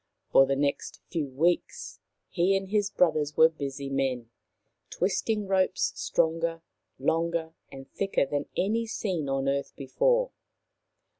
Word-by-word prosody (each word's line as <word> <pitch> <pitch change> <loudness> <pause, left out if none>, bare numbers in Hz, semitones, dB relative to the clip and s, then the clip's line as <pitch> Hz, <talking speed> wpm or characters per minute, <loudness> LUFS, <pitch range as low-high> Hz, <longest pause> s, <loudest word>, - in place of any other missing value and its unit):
For 135 - +6
the 135 - +1
next 140 +1 -2
few 155 -5 -2
weeks 175 - -1 0.3
he 190 +2 +2
and 195 0 -6
his 205 -1 +1
brothers 155 -6 +1
were 160 0 +7
busy 140 -3 -5
men, 130 -4 -2 0.6
twisting 210 +3 -1
ropes 190 -1 +1
stronger, 165 -2 0 0.3
longer 165 +3 0 0.2
and 135 0 -10
thicker 195 -7 0
than 145 +1 -3
any 225 +4 0
seen 180 -10 -2
on 135 0 -1
earth 140 0 -1
before. - - +1
165 Hz, 130 wpm, -28 LUFS, 140-190 Hz, 0.6 s, were